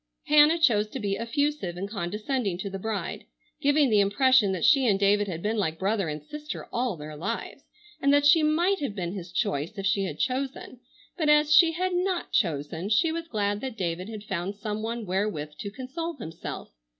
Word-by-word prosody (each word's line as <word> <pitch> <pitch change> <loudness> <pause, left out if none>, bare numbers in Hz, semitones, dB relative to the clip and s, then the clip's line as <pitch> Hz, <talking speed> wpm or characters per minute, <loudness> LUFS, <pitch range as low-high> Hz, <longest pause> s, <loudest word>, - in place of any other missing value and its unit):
Hannah 300 +2 +6
chose 225 -10 +3
to 260 - -6
be 200 -3 -1
effusive 230 - -2
and 195 +2 -3
condescending 210 +1 -2
to 200 +1 -5
the 195 - -5
bride, 215 0 -4 0.4
giving 285 -2 +3
the 210 - +5
impression 210 +2 +4
that 185 -3 -1
she 270 -4 +5
and 195 -3 +3
David 205 +1 +3
had 170 -3 -5
been 220 +2 0
like 160 -6 -1
brother 195 -2 0
and 150 0 -5
sister 300 - -7
all 240 -6 -1
their 150 0 -8
lives 205 +10 -5 0.4
and 280 - +3
that 285 0 +4
she 305 +2 +6
might 340 +6 +2
have 265 -8 -3
been 175 -3 -3
his 180 -3 -7
choice 150 +8 -2
if 195 - -4
she 195 0 +2
had - - -5
chosen, 260 -1 -3 0.4
but 310 -4 +1
as 300 0 +5
she 325 +1 +7
had 365 +2 -1
not 360 0 -1
chosen, 165 -1 -1
she 315 +10 +3
was 330 0 -4
glad 205 -5 -1
that 260 -4 -5
David 180 +1 -3
had 215 -2 -7
found 190 -1 -3
some 210 0 -4
one 230 0 -4
wherewith 185 -5 -2
to 200 - -4
console 275 +9 -5
himself. 165 - -7
215 Hz, 200 wpm, -27 LUFS, 190-285 Hz, 0.4 s, she